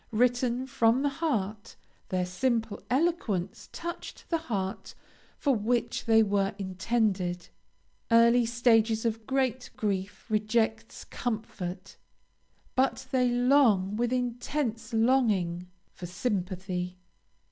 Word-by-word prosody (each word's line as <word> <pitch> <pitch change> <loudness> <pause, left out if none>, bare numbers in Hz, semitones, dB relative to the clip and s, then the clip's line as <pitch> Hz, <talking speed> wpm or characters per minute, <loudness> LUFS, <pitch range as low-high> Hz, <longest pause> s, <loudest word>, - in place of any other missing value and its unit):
Written 245 +2 +1
from 240 0 +2
the 285 - +2
heart, 215 - -2 0.3
their 185 -1 0
simple 225 +3 -1
eloquence 240 - -1
touched 340 0 -7
the 330 - +2
heart 200 -10 -4 0.4
for 280 - +2
which 235 +2 -1
they 225 -1 +5
were 200 0 0
intended. 190 -2 -1 0.6
Early 235 +1 +6
stages 225 -2 +3
of 225 -1 -2
great 260 -2 0
grief 200 -2 -2
reject 220 +1 -1
comfort, 215 -6 -5 0.8
but 260 0 +1
they 250 -2 +3
long, 245 -6 +3
with 240 +2 0
intense 245 -1 -2
longing, 220 -8 +2 0.2
for 175 - -8
sympathy. 185 -2 -3
225 Hz, 105 wpm, -28 LUFS, 195-245 Hz, 0.8 s, Early